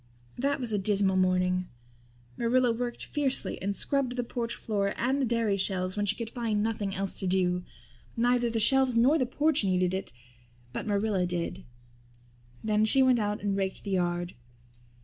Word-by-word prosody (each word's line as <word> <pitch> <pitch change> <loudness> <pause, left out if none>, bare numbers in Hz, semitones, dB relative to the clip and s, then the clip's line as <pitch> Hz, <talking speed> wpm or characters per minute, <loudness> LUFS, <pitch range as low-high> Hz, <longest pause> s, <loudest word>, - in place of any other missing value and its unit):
That 280 +3 0
was 245 -3 -3
a 205 - +1
dismal 195 -1 +1
morning. 185 0 +1 0.7
Marilla 245 +1 +2
worked 240 +1 -4
fiercely 280 -3 0
and 200 +1 -2
scrubbed 270 0 -1
the 245 - -1
porch 235 0 -4
floor 200 -2 -2
and 265 +4 0
the 260 - +1
dairy 225 -3 +1
shelves 185 -1 -1
when 205 0 -1
she 210 - +2
could 230 -1 -6
find 225 -4 -1
nothing 210 -3 -2
else 195 0 -2
to 190 - -3
do. 180 -1 +1 0.5
Neither 240 0 +2
the 230 0 -1
shelves 260 +2 +4
nor 270 +7 +4
the 255 - +1
porch 300 +1 +1
needed 185 -1 +1
it 190 0 -3 0.6
but - - -4
Marilla 200 -3 +1
did. 175 +1 -4 1.0
Then 215 0 +2
she 265 +5 +6
went 255 -2 +4
out 210 -1 -2
and 200 -1 0
raked 190 -1 -2
the 200 - -5
yard. 175 -1 -1
210 Hz, 175 wpm, -28 LUFS, 190-245 Hz, 1.0 s, she